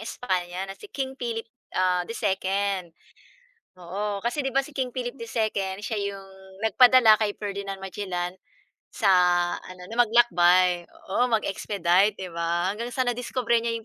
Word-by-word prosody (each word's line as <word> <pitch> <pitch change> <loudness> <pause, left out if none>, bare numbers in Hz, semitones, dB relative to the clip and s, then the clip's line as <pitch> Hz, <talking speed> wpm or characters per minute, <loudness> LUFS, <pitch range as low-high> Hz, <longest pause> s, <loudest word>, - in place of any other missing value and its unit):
Espanya 185 -5 -3
na - - -5
si 420 - -12
King 265 -5 -4
Philip, 230 -2 -3 0.3
ah, 185 -1 +2
II. 195 -3 -1 0.9
Oo. 200 +3 -3
Kasi 245 +6 -2
'di 270 - -2
ba 270 - +3
si 280 +2 -11
King 255 -2 -2
Philip 245 0 -4
II, 215 -5 -2
siya 220 +1 -3 0.2
'yong 190 0 -13
nagpadala 225 +1 +6
kay 215 -1 0
Ferdinand 200 -1 -5
Magellan 185 -2 -4 0.6
sa 205 -4 +3 0.5
ano, 185 0 -12
na - - -5
maglakbay 180 -6 +4
oo, 245 +6 -1
mag-expedite, 200 -3 +1
'di 185 -2 -7
ba? 170 +2 0
Hanggang 230 +3 -5
sa 255 +1 -1
nadiskubre 240 -1 0
niya 230 0 -1
'yong 225 - -8
205 Hz, 145 wpm, -25 LUFS, 185-235 Hz, 0.9 s, nagpadala